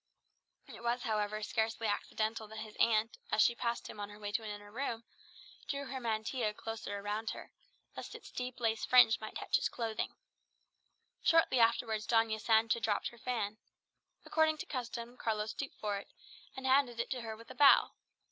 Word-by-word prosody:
It - - -11
was, 240 +1 0
however, 215 -2 -1
scarcely 225 +1 -1
accidental 220 +1 -1
that 215 0 -7
his 215 - -13
aunt, 225 0 +2
as 215 - +5
she 235 - +4
passed 235 0 -2
him - - -9
on 205 0 -4
her 205 - -11
way 205 -1 -5
to 210 - 0
an 220 - -6
inner 205 0 -8
room, 235 -1 -3 0.6
drew 280 0 -2
her 265 0 -5
mantilla 220 -1 -1
closer 220 -3 -5
round 210 +2 -2
her, - - -7 0.4
lest - - -7
its - - -11
deep 250 0 -5
lace 225 -2 0
fringe 245 -3 +6
might 215 - -7
touch - - +1
his - - 0
clothing. 225 -2 -3 1.1
Shortly 325 -6 +4
afterwards 225 -1 +2
Doña 225 -2 +2
Sancha 225 +1 +3
dropped 220 -2 0
her 235 - -16
fan. 220 -4 -2 0.7
According 315 -1 +3
to - - -5
custom, 240 -2 -5
Carlos 215 -2 -1
stooped 275 - -5
for 205 -1 -1
it, - - -13 0.5
and 265 - -5
handed 260 -3 +3
it 235 - -2
to 255 -2 -2
her 220 -1 -6
with 230 +1 -12
a - - -10
bow. 285 -1 +7
225 Hz, 185 wpm, -34 LUFS, 215-245 Hz, 1.1 s, bow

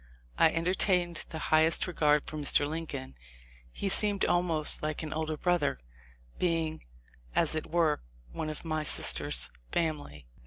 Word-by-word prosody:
I - - +4
entertained 175 +1 0
the 160 - -7 0.2
highest 160 +1 +3
regard 150 -4 +1
for - - -8
Mr. 145 -1 +1
Lincoln. 155 - -6 0.6
He 200 - -4
seemed 200 0 +4
almost 170 -4 +1
like 155 +1 -4
an 155 - -5
older 155 0 -3
brother, 175 - 0 0.6
being, 165 -3 -1 0.5
as - - +2
it 155 - -3
were, 160 -3 +1 0.3
one 155 - -5
of 155 +2 -7
my 155 -1 -2
sister's 155 - +4 0.2
family." 150 - -3
160 Hz, 140 wpm, -29 LUFS, 155-175 Hz, 0.6 s, I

